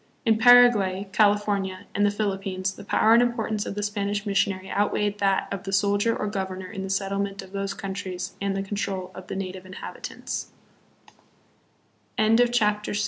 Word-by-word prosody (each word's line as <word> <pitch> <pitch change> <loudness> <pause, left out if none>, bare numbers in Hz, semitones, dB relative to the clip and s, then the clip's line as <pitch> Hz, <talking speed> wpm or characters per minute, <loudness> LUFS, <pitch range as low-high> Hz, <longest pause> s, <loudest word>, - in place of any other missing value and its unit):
In 220 -1 +3
Paraguay, 225 -6 +6
California, 205 -2 +1
and 205 - +1
the 205 - +5
Philippines 195 -2 -2
the - - -11
power 220 +2 +3
and 235 - +6
importance 225 -3 -1
of - - -4
the 205 - -3
Spanish 205 0 -2
missionary 195 -1 0
outweighed 205 0 0
that 195 -1 +1
of 195 - -3
the 195 0 -6
soldier 205 +3 +2
or - - -2
governor 190 -2 -4
in 195 -3 -5
the 190 - -5
settlement 195 0 -2
of 190 - -14
those 195 0 -3
coun 195 -1 -5
tries 185 -2 -5
and 200 -1 -1
the 195 - -2
control 195 -2 -3
of 185 0 -10
t 195 - -3
200 Hz, 150 wpm, -25 LUFS, 195-205 Hz, -, Paraguay